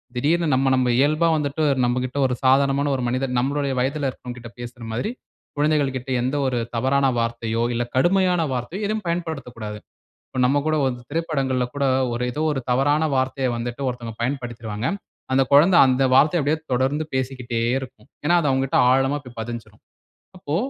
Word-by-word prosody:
திடீர்னு, 160 Hz, +6 st, +1 dB
நம்ம-நம்ம 130 Hz, -1 st, +2 dB
இயல்பா 155 Hz, +4 st, +3 dB
வந்துட்டு, 150 Hz, +1 st, -1 dB, 0.2 s
நம்மகிட்ட 125 Hz, +2 st, -1 dB
ஒரு 125 Hz, -, -1 dB
சாதாரணமான 140 Hz, +2 st, +3 dB
ஒரு 125 Hz, -, -3 dB
மனிதன் 130 Hz, 0 st, -1 dB
நம்முடைய 140 Hz, +1 st, -1 dB
வயதில 140 Hz, +2 st, -1 dB
இருக்குறவங்ககிட்ட 120 Hz, -2 st, -9 dB
பேசுற 120 Hz, 0 st, -9 dB
மாதிரி, 205 Hz, -, -2 dB, 0.5 s
குழந்தைகள் 145 Hz, -3 st, +1 dB
கிட்ட 130 Hz, +1 st, -9 dB
எந்த 130 Hz, +3 st, -1 dB
ஒரு 125 Hz, -2 st, 0 dB, 0.2 s
தவறான 135 Hz, +3 st, +2 dB
வார்த்தையோ 115 Hz, 0 st, -1 dB
இல்ல, 120 Hz, -, 0 dB
கடுமையான 180 Hz, +4 st, +3 dB
வார்த்தையோ 145 Hz, -, -4 dB
எதுவும் 215 Hz, 0 st, -2 dB
பயன்படுத்தக்கூடாது. 125 Hz, -11 st, -4 dB, 0.5 s
இப்ப 130 Hz, -, -4 dB
நம்ம 140 Hz, +3 st, +2 dB
கூட 155 Hz, -, +2 dB
ஒரு 130 Hz, -2 st, 0 dB, 0.2 s
திரைப்படங்கள்ல 135 Hz, -6 st, 0 dB
கூட, 140 Hz, -1 st, 0 dB, 0.3 s
ஒரு 120 Hz, +1 st, -2 dB
ஏதோ 155 Hz, -, -2 dB
ஒரு 135 Hz, -, -3 dB
தவறான 145 Hz, +5 st, +2 dB
வார்த்தையை 130 Hz, 0 st, 0 dB
வந்துட்டு, 120 Hz, +3 st, -5 dB
ஒருத்தவங்க 120 Hz, -3 st, -6 dB
பயன்படுத்திருவாங்க. 120 Hz, -3 st, -3 dB, 0.5 s
அந்த 135 Hz, 0 st, +4 dB
குழந்தை 165 Hz, +6 st, +6 dB
அந்த 130 Hz, +1 st, +2 dB
வார்த்தையை 150 Hz, +6 st, +5 dB
அப்படியே 150 Hz, +3 st, +1 dB
தொடர்ந்து 135 Hz, +5 st, +1 dB
பேசிக்கிட்டே 130 Hz, -3 st, -2 dB, 0.2 s
இருக்கும். 125 Hz, -3 st, -11 dB, 0.2 s
ஏனா, 175 Hz, +4 st, +4 dB
அது 150 Hz, -, 0 dB
அவங்கட்ட 135 Hz, 0 st, +1 dB
ஆழமா 135 Hz, +2 st, +2 dB
போய் 120 Hz, -2 st, -13 dB
பதிஞ்சுரும். 120 Hz, 0 st, -7 dB, 0.6 s
அப்போ, 150 Hz, -3 st, -3 dB
135 Hz, 155 wpm, -22 LUFS, 125-145 Hz, 0.6 s, குழந்தை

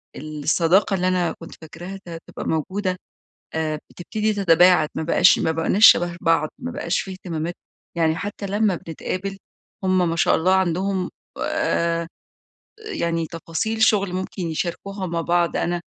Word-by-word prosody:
ال 155 Hz, -1 st, -7 dB
الصداقة 175 Hz, +6 st, +3 dB
اللي 180 Hz, -1 st, 0 dB
أنا 180 Hz, -2 st, +1 dB
كنت 165 Hz, -, -10 dB
فاكراها 175 Hz, +5 st, -8 dB
ت -, -, -10 dB
هتبقى 165 Hz, -1 st, -8 dB
موجودة 185 Hz, +4 st, -1 dB, 0.6 s
آآ، 155 Hz, -1 st, -1 dB
بتبتدي 215 Hz, +5 st, -2 dB
تتباعد 180 Hz, -4 st, +5 dB
ما -, -, -2 dB
بقاش 160 Hz, -, +5 dB
ما -, -, +1 dB
بقيناش 165 Hz, +7 st, +5 dB
شبه 175 Hz, 0 st, +5 dB
بعض، 165 Hz, -2 st, +2 dB
ما 250 Hz, -, -5 dB
بقاش 170 Hz, -6 st, -1 dB
في 195 Hz, -, -7 dB
اهتمامات 175 Hz, -2 st, -4 dB, 0.4 s
يعني 160 Hz, -1 st, +2 dB
حتى 200 Hz, +2 st, -5 dB
لما 205 Hz, -1 st, +1 dB
بنتقابل 185 Hz, +4 st, -5 dB, 0.5 s
هم 185 Hz, -2 st, +3 dB
ما 165 Hz, -, -2 dB
شاء -, -, +3 dB
الله 185 Hz, +3 st, +3 dB
عندهم 190 Hz, +1 st, 0 dB, 0.3 s
آآ، 170 Hz, -, 0 dB, 0.7 s
يعني 170 Hz, -, -2 dB
تفاصيل 170 Hz, +7 st, -3 dB
شغل 200 Hz, -4 st, +3 dB
ممكن 185 Hz, 0 st, -4 dB
يشاركوها 180 Hz, +4 st, -3 dB
مع 170 Hz, -1 st, -2 dB
بعض، 170 Hz, 0 st, +1 dB
أنا 175 Hz, 0 st, -1 dB
175 Hz, 150 wpm, -22 LUFS, 165-195 Hz, 0.7 s, تتباعد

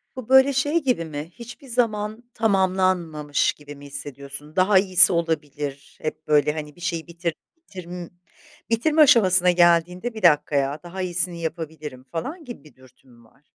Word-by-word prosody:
Bu, 255 Hz, -2 st, -9 dB
böyle, 265 Hz, +1 st, +6 dB
şey 290 Hz, +5 st, 0 dB
gibi 250 Hz, -11 st, 0 dB
mi, 155 Hz, +1 st, -7 dB
hiçbir 240 Hz, +4 st, -12 dB
zaman 220 Hz, -2 st, -2 dB
tamamlanmamış 185 Hz, -8 st, 0 dB
gibi 145 Hz, 0 st, -12 dB
mi 140 Hz, 0 st, -14 dB
hissediyorsun? 140 Hz, +1 st, -8 dB
Daha 190 Hz, +1 st, +4 dB
iyisi 185 Hz, -1 st, +6 dB
olabilir, 150 Hz, -4 st, -4 dB
hep, 155 Hz, 0 st, -6 dB
böyle, 150 Hz, -1 st, +3 dB
hani, 150 Hz, -1 st, -7 dB
bir 175 Hz, -, -18 dB
şeyi 170 Hz, -2 st, -3 dB
bitir 170 Hz, 0 st, -4 dB, 0.2 s
bitirm 180 Hz, -, -9 dB, 0.6 s
bitirme 300 Hz, +8 st, +2 dB
aşamasına 185 Hz, -9 st, +5 dB
geldiğinde 175 Hz, +5 st, +2 dB
1 220 Hz, -, -8 dB
dakikaya 145 Hz, -3 st, +2 dB
daha 185 Hz, +2 st, -7 dB
iyisini 175 Hz, -1 st, -1 dB
yapabilirim 155 Hz, -5 st, -6 dB
falan 285 Hz, -, -6 dB
gibi 240 Hz, -, -10 dB
bir 150 Hz, -, -19 dB
dürtü 130 Hz, 0 st, -22 dB
mü 120 Hz, -1 st, -20 dB
var? 120 Hz, +5 st, -26 dB
175 Hz, 155 wpm, -23 LUFS, 150-210 Hz, 0.6 s, böyle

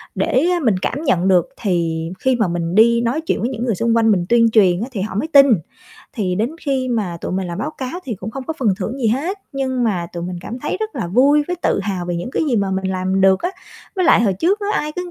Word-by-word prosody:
để 265 Hz, +6 st, +1 dB, 0.2 s
mình 220 Hz, -6 st, +3 dB
cảm 280 Hz, +5 st, -2 dB
nhận 185 Hz, -, +1 dB
được, 180 Hz, -3 st, +3 dB
thì 165 Hz, -5 st, -1 dB
khi 260 Hz, -1 st, +2 dB
mà 220 Hz, -5 st, +1 dB
mình 170 Hz, +1 st, -2 dB
đi 235 Hz, +2 st, +5 dB
nói 245 Hz, +7 st, -1 dB
chuyện 325 Hz, -, -1 dB
với 240 Hz, -, 0 dB
những 245 Hz, -1 st, -4 dB
người 225 Hz, -5 st, 0 dB
xung 230 Hz, +4 st, +1 dB
quanh 225 Hz, -1 st, +4 dB
mình 180 Hz, -3 st, +1 dB
tuyên 230 Hz, -1 st, +4 dB
truyền 190 Hz, -4 st, +4 dB
á, 240 Hz, -, -3 dB
thì 200 Hz, -6 st, -4 dB
họ 200 Hz, -1 st, -4 dB
mới 295 Hz, +10 st, -1 dB
tin. 280 Hz, -3 st, +7 dB, 0.7 s
Thì 195 Hz, -8 st, -1 dB
đến 220 Hz, +7 st, -1 dB
khi 265 Hz, -3 st, -1 dB
mà 205 Hz, -8 st, -2 dB
tụi -, -, -4 dB
mình 190 Hz, -1 st, -2 dB
làm 170 Hz, +2 st, -5 dB
báo 300 Hz, +7 st, -2 dB
cáo 275 Hz, +6 st, -6 dB
thì 235 Hz, -, -3 dB
cũng 195 Hz, +3 st, -7 dB
không 265 Hz, +2 st, -7 dB
có 320 Hz, -, -3 dB
phần 240 Hz, -5 st, +1 dB
thưởng 225 Hz, +8 st, -4 dB
gì 235 Hz, -, 0 dB
hết, 325 Hz, -, -1 dB
nhưng 260 Hz, -2 st, -1 dB
mà 180 Hz, -6 st, -1 dB
tụi 170 Hz, -1 st, -5 dB
mình 180 Hz, 0 st, -5 dB
cảm 240 Hz, +6 st, -7 dB
thấy 295 Hz, -, -3 dB
rất 435 Hz, 0 st, -3 dB
là -, -, -2 dB
vui 275 Hz, +10 st, +4 dB
với 360 Hz, -, -2 dB
tự -, -, +1 dB
hào 190 Hz, -3 st, -3 dB
về 175 Hz, -1 st, -2 dB
những 175 Hz, +9 st, -5 dB
cái -, -, -1 dB
gì 240 Hz, -, +1 dB
mà 200 Hz, -1 st, 0 dB
mình 190 Hz, 0 st, -2 dB
làm 185 Hz, +1 st, -1 dB
được 190 Hz, 0 st, +4 dB
á. 355 Hz, -, 0 dB, 0.5 s
Với 370 Hz, -, +1 dB
lại 230 Hz, -, +5 dB
hồi 200 Hz, -4 st, +2 dB
trước 380 Hz, -, +1 dB
á, 405 Hz, -, -3 dB
ai 300 Hz, 0 st, -5 dB
cứ 360 Hz, +1 st, -5 dB
225 Hz, 280 wpm, -19 LUFS, 185-265 Hz, 0.7 s, tin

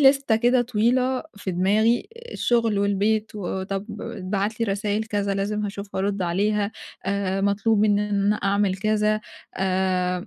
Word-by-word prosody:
لِستَة 275 Hz, -4 st, +5 dB
كده 245 Hz, +2 st, +3 dB
طويلة 250 Hz, +3 st, +1 dB
في 200 Hz, -, -4 dB
دماغي 210 Hz, +6 st, +2 dB, 0.2 s
الشغل 230 Hz, -4 st, +1 dB
والبيت 205 Hz, +2 st, +1 dB
وطب 195 Hz, +1 st, -3 dB, 0.2 s
اتبعت 205 Hz, 0 st, -3 dB
لي 230 Hz, -, +2 dB
رسايل 205 Hz, +1 st, -1 dB
كذا 205 Hz, -2 st, -1 dB
لازم 210 Hz, +2 st, -1 dB
هاشوف 200 Hz, 0 st, -6 dB
وأرد 195 Hz, 0 st, -1 dB
عليها. 205 Hz, +4 st, 0 dB, 0.3 s
آآ 195 Hz, -1 st, 0 dB
مطلوب 205 Hz, +2 st, +2 dB
إن 205 Hz, -1 st, +3 dB
أنا 210 Hz, 0 st, -2 dB
أنا 210 Hz, +1 st, +3 dB
أعمل 200 Hz, -1 st, +1 dB
كذا، 215 Hz, +1 st, +1 dB, 0.4 s
آآ، 185 Hz, 0 st, 0 dB
205 Hz, 140 wpm, -24 LUFS, 195-220 Hz, 0.4 s, لِستَة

